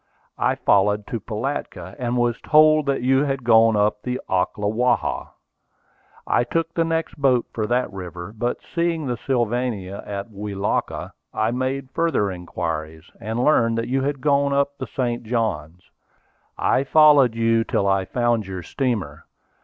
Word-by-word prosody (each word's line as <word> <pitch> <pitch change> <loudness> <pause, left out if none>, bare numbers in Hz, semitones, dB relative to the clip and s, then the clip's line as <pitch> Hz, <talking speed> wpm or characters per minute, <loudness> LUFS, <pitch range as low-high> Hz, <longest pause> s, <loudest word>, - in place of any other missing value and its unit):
I - - +2
followed 105 +1 +2
to 115 - -2
Pilatka, 105 -5 -5
and 125 0 -1
was 120 -1 0
told 155 -1 +5
that 135 -3 0
you 135 +2 +3
had 135 -2 -2
gone 115 -1 +5
up 105 0 +1
the 125 +2 -3
Ocklawaha. 105 +6 0 1.0
I - - +2
took 165 +6 -2
the 165 - +1
next 165 0 -2
boat 130 -3 +3
for 110 -2 -2
that 125 -2 0
river, 90 +1 -7
but 120 +3 -1 0.2
seeing 170 -2 0
the 125 -2 -2
Sylvania 120 -6 -1
at 100 +2 -5
Welaka, 100 -1 -3 0.2
I 110 +1 +1
made 130 +2 -3
further 145 -13 0
inquiries, 80 -3 -5
and 110 +3 -2
learned 115 -6 +3
that 115 - -2
you 135 +1 +1
had 140 0 -2
gone 140 0 +2
up 140 0 +1
the - - -4
St. 120 -3 -2
Johns. 90 - -3 0.7
I 130 - +2
followed 145 -5 +5
you 115 0 +2
till 100 - 0
I 95 -1 +2
found 120 -2 0
your 95 -2 -6
steamer. 105 - -3
120 Hz, 155 wpm, -22 LUFS, 105-135 Hz, 1.0 s, told